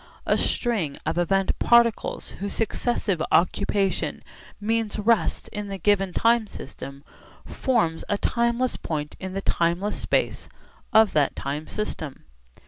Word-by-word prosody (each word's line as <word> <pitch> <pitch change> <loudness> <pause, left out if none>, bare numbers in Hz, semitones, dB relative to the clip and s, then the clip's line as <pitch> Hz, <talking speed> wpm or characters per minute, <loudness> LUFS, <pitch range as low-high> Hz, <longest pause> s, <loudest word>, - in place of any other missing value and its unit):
A - - +3
string 200 - 0
of - - 0
event 195 +2 +1
particles 235 -1 +3
whose 200 +1 -3
successive 220 -5 0
occupation 195 +2 +1 0.4
means 220 0 -1
rest 220 +2 +1
in 210 -1 -5
the 195 -1 -4
given 195 0 +2
time 230 +3 +3
system 140 -4 -9 0.4
forms 195 -11 0
a 205 - +1
timeless 235 +3 0
point 150 -2 -4
in 190 0 -5
the 195 - -2
timeless 175 +3 0
space - - -1 0.4
of 220 -3 +5
that 145 -3 +2
time 145 +3 -4
system. 160 -9 -5
200 Hz, 130 wpm, -25 LUFS, 170-225 Hz, 0.4 s, of